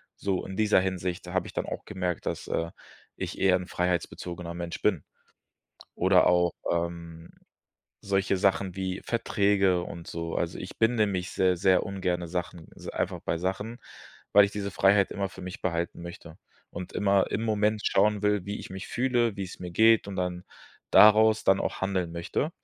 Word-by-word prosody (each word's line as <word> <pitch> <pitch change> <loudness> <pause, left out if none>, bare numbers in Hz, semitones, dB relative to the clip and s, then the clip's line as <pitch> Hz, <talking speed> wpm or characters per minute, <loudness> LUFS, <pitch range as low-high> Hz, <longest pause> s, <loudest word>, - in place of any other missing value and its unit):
So, 95 -2 -2
in 95 - -7
dieser 105 -2 +4
Hinsicht, 90 -2 -3
da - - -7
habe - - 0
ich - - -10
dann - - -2
auch - - -5
gemerkt, 90 -4 -3
dass, - - -3
äh, 85 0 -2 0.5
ich - - -5
eher 95 -1 +4
'n 90 -1 -7
freiheitsbezogener 90 -1 -3
Mensch 85 -1 -6
bin. 95 -8 +1 0.9
Oder 95 0 +4
auch, 90 -1 +3 0.2
ähm, 85 -1 -4 0.7
solche 100 -1 +1
Sachen 95 -1 +1
wie 95 0 -3
Verträge 100 -5 +2
und 85 -1 -8
so. 85 0 -4
Also 85 0 -2
ich 95 - -8
binde 115 -1 +3
mich 95 -2 -3
seh 90 -1 +2
sehr 95 +1 +3
ungerne 90 -3 -2
Sachen 90 -1 -5
also - - -8
einfach - - -2
bei - - -1
Sachen, 95 +6 -3 0.5
weil 100 0 +8
ich 100 - -3
diese 100 -1 -3
Freiheit 100 0 +3
immer 100 -1 -2
für 95 - -12
mich 90 +1 -7
behalten 85 -1 -2
möchte 85 -2 -10 0.3
und 90 - -7
immer 100 -1 +2
im 110 - -1
Moment 105 -1 +1
schauen 105 +1 +2
will, 105 -2 +1
wie 100 +1 -4
ich - - -10
mich 95 +1 -7
fühle, 120 -3 +1
wie's 95 -2 -6
mir 90 -1 -6
geht, 110 +2 +5
und 100 - -5
dann 90 -1 -3 0.5
daraus 110 +1 +7
dann 95 0 +4
auch - - -3
handeln 95 -3 -1
möchte. 85 - -2
95 Hz, 180 wpm, -27 LUFS, 90-100 Hz, 0.9 s, weil